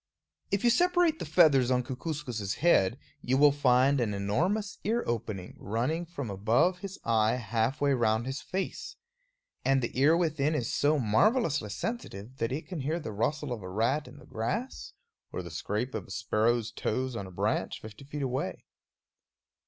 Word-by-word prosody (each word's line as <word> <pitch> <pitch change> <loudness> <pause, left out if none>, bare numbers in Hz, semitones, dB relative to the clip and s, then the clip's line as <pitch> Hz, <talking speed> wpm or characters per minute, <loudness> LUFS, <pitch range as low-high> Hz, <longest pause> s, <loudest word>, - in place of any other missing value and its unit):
If 200 +2 0
you 240 - +5
separate 350 0 +3
the - - -4
feathers 150 -6 +5
on 125 -1 +2
Kookooskoos' 125 - -4
head, 130 - +3 0.2
you 130 +2 +1
will 145 +1 +7
find 135 -1 +3
an 105 -4 0
enormous 175 - -1
ear 230 +3 0
opening 105 -5 -4
running 125 - -1
from 140 -7 -5
above 115 - +2
his 195 0 -7
eye 110 -1 +3
halfway 125 +5 0
round 115 -2 +1
his 135 +2 -4
face. 190 +1 -4 0.7
And 135 0 +3
the 120 - -3
ear 155 +5 +5
within 155 -3 +1
is 120 -6 -2
so 150 +2 +3
marvelously 145 - +2
sensitive 120 - -5
that 115 -1 -1
it 150 +5 -4
can 180 -4 -5
hear 155 +5 -1
the 130 - -6
rustle 140 +6 -1
of 115 - -6
a 90 - -7
rat 120 +9 0
in 125 - -12
the - - -14
grass, 225 - -4 0.4
or 90 - -4
the 85 - -8
scrape 105 +9 -3
of 105 -5 -5
a - - -18
sparrow's 110 +4 0
toes 130 +2 -2
on 100 -4 -4
a - - -11
branch - - -1
fifty 110 +4 -11
feet 145 +1 -5
away. 130 -7 -3
130 Hz, 175 wpm, -29 LUFS, 110-155 Hz, 0.7 s, will